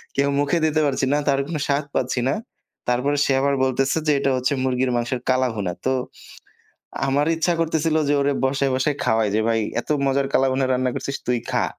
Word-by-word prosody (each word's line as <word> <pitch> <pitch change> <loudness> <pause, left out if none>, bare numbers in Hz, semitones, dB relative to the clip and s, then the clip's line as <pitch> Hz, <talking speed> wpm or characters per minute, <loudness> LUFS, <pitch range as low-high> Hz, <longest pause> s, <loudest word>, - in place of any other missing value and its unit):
কেউ 140 0 +2
মুখে 145 +4 +1
দিতে 155 0 +1
পারছি 135 -1 0
না, - - +3
তার 140 -1 +3
কোন 165 - -4
স্বাদ 140 +1 0
পাচ্ছি 130 0 0
না। - - +2 0.5
তারপরে 125 +4 +1
সে - - +1
আবার 140 0 +2
বলতেছে 135 +2 +1
যে - - +5
এটা 140 - +1
হচ্ছে 130 +2 0
মুরগির 130 0 0
মাংসের 120 +1 -1
কালাভুনা। 120 -7 0
তো 130 - +2 1.1
আমার 140 +2 +1
ইচ্ছা 165 +2 +1
করতেছিল 160 -1 +1
যে 145 - +3
ওরে 140 0 +2
বসায়, 135 +1 +1
বসায়, 135 +3 0
খাওয়াই 110 -1 +2
যে 110 - +2
ভাই, 115 -1 +2 0.2
"এত - - -18 0.2
মজার 135 0 +1
কালাভুনা 135 0 +2
রান্না 130 0 +1
করছিস 140 - -3
তুই 125 -1 +2
খা।" - - +1
135 Hz, 195 wpm, -22 LUFS, 130-145 Hz, 1.1 s, যে